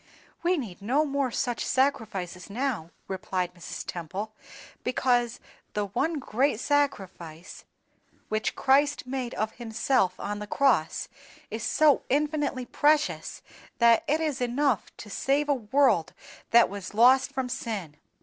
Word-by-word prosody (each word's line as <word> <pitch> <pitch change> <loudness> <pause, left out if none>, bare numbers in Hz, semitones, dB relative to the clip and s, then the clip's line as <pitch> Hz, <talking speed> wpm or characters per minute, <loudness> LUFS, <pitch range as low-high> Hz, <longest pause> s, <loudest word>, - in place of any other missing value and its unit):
"We 355 +1 +2
need 210 - -6
no 265 +9 +2
more 280 -2 0
such 245 0 -2
sacrifices 205 -10 -1
now," 225 -7 -2 0.2
replied 185 -1 -2
Mrs. 175 -2 -7
Temple, 190 +6 -5 0.5
"because 245 -2 +1 0.4
the 210 -1 0
One 315 - -1
great 260 -2 0
Sacrifice 190 - -2 0.6
which 215 0 -1
Christ 280 +1 +3
made 255 -1 -4
of 215 0 -2
Himself 225 -4 0
on 205 0 -3
the 210 - -6
cross 235 - +2 0.4
is 220 +1 -4
so 295 +5 +4
infinitely 290 -2 0
precious, 300 +3 +1 0.3
that 235 -1 +5
it 305 +2 +2
is 300 -5 -2
enough 245 -1 +1
to - - -9
save 280 +6 +1
a 290 - +4
world 240 - +2 0.4
that 235 0 +6
was 200 0 -7
lost 255 +4 +5
from 265 -2 -2
sin. 205 -11 -4
240 Hz, 130 wpm, -27 LUFS, 205-275 Hz, 0.6 s, that